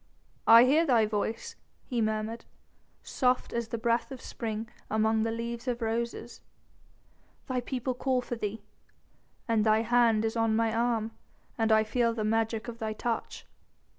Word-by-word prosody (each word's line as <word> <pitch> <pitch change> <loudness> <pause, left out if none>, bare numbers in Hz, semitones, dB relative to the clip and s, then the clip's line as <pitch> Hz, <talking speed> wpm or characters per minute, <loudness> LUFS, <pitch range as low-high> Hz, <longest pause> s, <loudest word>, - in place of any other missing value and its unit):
"I 230 +1 +9
hear 290 +6 +4
thy 240 -8 +4
voice," 215 +1 -3 0.3
he 245 -3 -1
murmured, 220 +1 -2 0.6
"soft 250 -1 0
as 235 -1 -2
the 230 - -4
breath 235 +2 0
of 265 - -7
spring 220 -1 -5 0.2
among 220 +1 +2
the 225 - 0
leaves 235 +2 -4
of 240 -1 -1
roses." 235 +1 -3 1.0
"The 255 -2 -2
people 255 0 -3
call 255 0 0
for 245 - -5
thee." 215 -1 -4 0.8
"And 225 -2 +2
thy 220 0 +3
hand 230 -2 +3
is 225 - -2
on 225 -1 +2
my 225 0 +1
arm 230 -1 0 0.4
and 225 -1 +1
I 220 0 +5
feel 230 +1 0
the 220 - -2
magic 225 +1 0
of 230 -1 -7
thy 220 -2 -2
touch." 230 +1 -4
230 Hz, 160 wpm, -29 LUFS, 220-240 Hz, 1.0 s, I